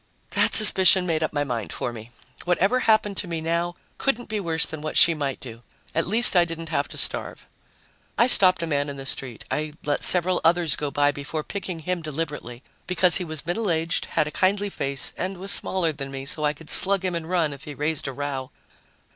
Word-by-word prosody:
That -, -, +2 dB
suspicion 190 Hz, -3 st, +7 dB
made 165 Hz, -3 st, -2 dB
up 155 Hz, -, -2 dB
my 145 Hz, -1 st, -2 dB
mind 120 Hz, -6 st, -5 dB
for 120 Hz, -, -5 dB
me. 110 Hz, 0 st, -11 dB, 0.3 s
Whatever 195 Hz, +7 st, +1 dB
happened 215 Hz, -4 st, +1 dB
to 185 Hz, -, -4 dB
me 165 Hz, -1 st, -4 dB
now 170 Hz, +2 st, -3 dB, 0.2 s
couldn't 245 Hz, -4 st, -2 dB
be 215 Hz, -1 st, -3 dB
worse 165 Hz, -4 st, -1 dB
than 160 Hz, -2 st, -9 dB
what 155 Hz, -, -4 dB
she 170 Hz, -, +6 dB
might 140 Hz, -4 st, -4 dB
do. 115 Hz, -2 st, -11 dB, 0.3 s
At 165 Hz, -, -1 dB
least 225 Hz, +2 st, +6 dB
I 175 Hz, -, +5 dB
didn't 165 Hz, -1 st, -7 dB
have -, -, -2 dB
to -, -, -10 dB
starve. -, -, -1 dB, 0.7 s
I 235 Hz, -, +4 dB
stopped 185 Hz, -8 st, +6 dB
a -, -, -1 dB
man 145 Hz, -2 st, -2 dB
in 140 Hz, -, -8 dB
the 135 Hz, -, -9 dB
street. 130 Hz, -3 st, -1 dB
I 155 Hz, 0 st, -3 dB
let 145 Hz, -1 st, -2 dB
several 180 Hz, 0 st, +4 dB
others 165 Hz, -2 st, +2 dB
go 150 Hz, -, -4 dB
by 145 Hz, 0 st, +1 dB
before 145 Hz, +2 st, -6 dB
picking 185 Hz, -3 st, -6 dB
him 180 Hz, +2 st, -4 dB
deliberately 150 Hz, -5 st, -7 dB, 0.2 s
because 180 Hz, -1 st, +2 dB
he -, -, -4 dB
was 155 Hz, -3 st, -7 dB
middle 195 Hz, +5 st, -3 dB
aged, 165 Hz, 0 st, -2 dB
had -, -, -1 dB
a 150 Hz, -, -6 dB
kindly 200 Hz, +3 st, -1 dB
face, 140 Hz, -4 st, -3 dB
and 190 Hz, +1 st, -5 dB
was 195 Hz, +2 st, 0 dB
smaller 175 Hz, -4 st, +1 dB
than 140 Hz, -1 st, -8 dB
me, 135 Hz, 0 st, -8 dB
so 150 Hz, +2 st, -2 dB
I 150 Hz, -, 0 dB
could 150 Hz, +1 st, -4 dB
slug 195 Hz, 0 st, +6 dB
him 185 Hz, -, -2 dB
and 165 Hz, -1 st, -6 dB
run 165 Hz, -5 st, -1 dB
if 140 Hz, +1 st, -13 dB
he 150 Hz, -, -9 dB
raised 150 Hz, 0 st, -4 dB
a -, -, -4 dB
row. 135 Hz, -1 st, -6 dB
165 Hz, 220 wpm, -23 LUFS, 145-185 Hz, 0.7 s, suspicion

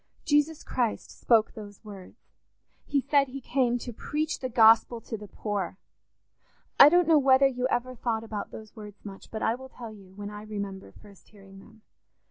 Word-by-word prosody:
Jesus 295 Hz, +1 st, +1 dB
Christ 240 Hz, -4 st, -2 dB
spoke 225 Hz, -2 st, +2 dB
those 205 Hz, 0 st, -11 dB
words—he 205 Hz, +7 st, -8 dB
said 280 Hz, +1 st, +2 dB
he 265 Hz, +2 st, -7 dB
came 245 Hz, -1 st, 0 dB
to 240 Hz, 0 st, -7 dB
preach 305 Hz, +7 st, -3 dB
the 255 Hz, -, -4 dB
Gospel 230 Hz, 0 st, +5 dB
to 225 Hz, -, -6 dB
the 210 Hz, -1 st, -9 dB
poor: 200 Hz, -3 st, -4 dB, 1.0 s
I 280 Hz, -, +11 dB
don't 350 Hz, +1 st, +3 dB
know 320 Hz, -2 st, +6 dB
whether 270 Hz, 0 st, +5 dB
you 255 Hz, -1 st, 0 dB
ever 255 Hz, 0 st, -2 dB
thought 230 Hz, -2 st, -2 dB
about 215 Hz, -2 st, -6 dB
those 215 Hz, 0 st, -11 dB
words 210 Hz, -2 st, -12 dB
much, 195 Hz, -1 st, -10 dB
but 220 Hz, -, -5 dB
I 225 Hz, -, +2 dB
will 265 Hz, +2 st, -9 dB
tell 235 Hz, -3 st, -9 dB
you 195 Hz, -3 st, -16 dB
when 205 Hz, 0 st, -7 dB
I 210 Hz, 0 st, -8 dB
remember 200 Hz, -2 st, -7 dB
first 200 Hz, -2 st, -18 dB
hearing 195 Hz, -2 st, -16 dB
them. 220 Hz, +2 st, -18 dB
225 Hz, 180 wpm, -27 LUFS, 205-260 Hz, 1.0 s, I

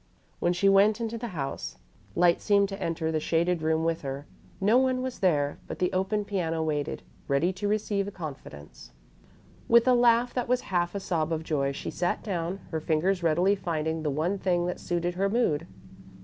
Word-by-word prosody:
When 175 Hz, -, +2 dB
she 185 Hz, +3 st, +2 dB
went 200 Hz, +3 st, +5 dB
into 230 Hz, 0 st, -3 dB
the 240 Hz, -, -4 dB
house, 135 Hz, -, -4 dB, 0.4 s
light 175 Hz, 0 st, +4 dB
seemed 200 Hz, -1 st, +3 dB
to 195 Hz, 0 st, -7 dB
enter 165 Hz, -2 st, -1 dB
the 155 Hz, -, 0 dB
shaded 170 Hz, +2 st, +1 dB
room 160 Hz, 0 st, +1 dB
with 165 Hz, 0 st, 0 dB
her. 140 Hz, +1 st, -5 dB, 0.3 s
No 215 Hz, +6 st, +4 dB
one 255 Hz, -1 st, +1 dB
was 260 Hz, -1 st, -4 dB
there, 145 Hz, -6 st, +1 dB
but -, -, -6 dB
the 180 Hz, -, 0 dB
open 195 Hz, +3 st, 0 dB
piano 165 Hz, -5 st, -1 dB
waited, 150 Hz, -1 st, -2 dB, 0.2 s
ready 155 Hz, +6 st, +2 dB
to 205 Hz, +2 st, -3 dB
receive 205 Hz, -1 st, 0 dB
a -, -, -5 dB
confidence. 75 Hz, -, -9 dB, 0.7 s
With 235 Hz, +1 st, +5 dB
a 255 Hz, -, +6 dB
laugh 240 Hz, 0 st, +4 dB
that 250 Hz, -2 st, -1 dB
was 250 Hz, +1 st, +2 dB
half 175 Hz, +1 st, +1 dB
a -, -, -1 dB
sob 165 Hz, -4 st, -1 dB
of 160 Hz, -1 st, -1 dB
joy, 140 Hz, -4 st, 0 dB
she 140 Hz, -, -5 dB
sat 175 Hz, 0 st, -1 dB
down, 180 Hz, -1 st, -3 dB
her 160 Hz, -, -1 dB
fingers 175 Hz, +5 st, +1 dB
readily 170 Hz, +4 st, +3 dB
finding 160 Hz, -4 st, -2 dB
the 155 Hz, -, -1 dB
one 165 Hz, +8 st, -1 dB
thing 175 Hz, -2 st, +1 dB
that 180 Hz, -, -3 dB
suited 175 Hz, 0 st, -1 dB
her 195 Hz, +2 st, 0 dB
mood. 170 Hz, -8 st, +1 dB
175 Hz, 195 wpm, -27 LUFS, 160-200 Hz, 0.7 s, a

